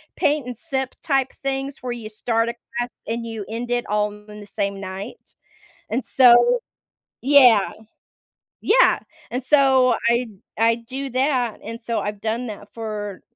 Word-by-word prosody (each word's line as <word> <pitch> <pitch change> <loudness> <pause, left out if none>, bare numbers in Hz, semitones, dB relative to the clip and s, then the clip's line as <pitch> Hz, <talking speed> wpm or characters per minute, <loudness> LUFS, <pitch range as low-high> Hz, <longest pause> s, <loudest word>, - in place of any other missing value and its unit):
paint 290 -2 +1
and 250 -1 -6
sip-type 265 +1 -1
things 270 0 -4
where 250 -1 -4
you 235 -2 -6
start 230 +1 0
a - - -3 0.2
class 240 0 -1 0.2
and 230 +1 -3
you 225 -3 -5
end 235 +2 -4
it 240 0 0
all 210 0 +1
in 210 0 -12
the 205 - -10
same 200 -1 -3
night, 190 +1 -8 0.5
and 245 +4 -1
so 265 - +6 0.6
Yeah. 250 -6 +6 0.9
Yeah, - - +4 0.3
and 250 +2 -3
so, 265 -3 +4
I 235 +1 +2 0.3
I 230 +1 +4
do 260 +4 -6
that 255 -3 0
and 230 +2 -7
so 230 0 -2
I've 205 -1 -4
done 230 +3 -2
that 205 -1 -9
for 210 -3 -5
235 Hz, 155 wpm, -22 LUFS, 215-265 Hz, 0.9 s, so